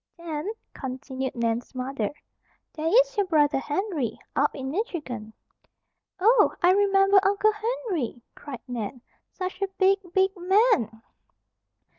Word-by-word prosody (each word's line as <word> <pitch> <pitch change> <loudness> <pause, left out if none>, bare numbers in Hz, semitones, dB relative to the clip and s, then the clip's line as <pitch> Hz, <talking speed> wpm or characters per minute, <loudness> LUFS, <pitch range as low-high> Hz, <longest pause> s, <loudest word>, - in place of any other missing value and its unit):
"Then," 330 +1 -4 0.2
continued 265 0 -5
Nan's 235 +2 -2
mother, 255 -4 -2 0.6
"there 315 0 -3
is - - +4
your 405 -3 +1
brother, 295 -4 +3
Henry, 295 - -2 0.2
up 290 - +2
in 265 -1 -4
Michigan." 295 - -4 0.9
"Oh! 450 +7 +4
I 355 - +7
remember 390 0 +5
Uncle 405 +2 +3
Henry," 425 - -3
cried 270 -5 -9
Nan. 240 0 -5 0.3
"Such 370 0 -6
a 395 - +1
big, 385 +1 +4
big 380 +1 +3
man!" 360 - +2
325 Hz, 120 wpm, -26 LUFS, 260-395 Hz, 0.9 s, I